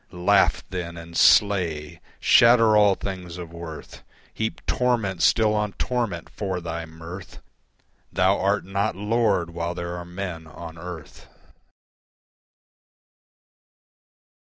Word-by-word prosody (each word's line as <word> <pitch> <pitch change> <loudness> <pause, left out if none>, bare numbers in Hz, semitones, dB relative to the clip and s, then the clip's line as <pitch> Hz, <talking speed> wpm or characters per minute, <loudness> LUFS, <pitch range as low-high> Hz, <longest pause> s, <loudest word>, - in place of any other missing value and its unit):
Laugh 95 +3 +2
then 85 -2 -5
and 85 0 -10
slay. 85 -6 +3 0.2
Shatter 115 -2 +6
all 105 -2 +5
things 90 -3 -6
of 85 -2 -8
worth, 85 -2 -9 0.3
Heap 110 0 -4
torment 115 -8 0
still 110 -2 +4
on 105 -1 -1
torment 115 -9 -2
for 95 -3 -4
thy 85 -1 -5
mirth 85 +3 -10 0.7
Thou 95 +2 +2
art 100 +1 +1
not 100 +1 -1
Lord 105 -4 +1
while 85 +1 -3
there 85 0 -4
are 90 - -6
Men 90 -2 -6
on 80 +1 -10
earth. 85 -2 -9
90 Hz, 110 wpm, -24 LUFS, 85-105 Hz, 0.7 s, Shatter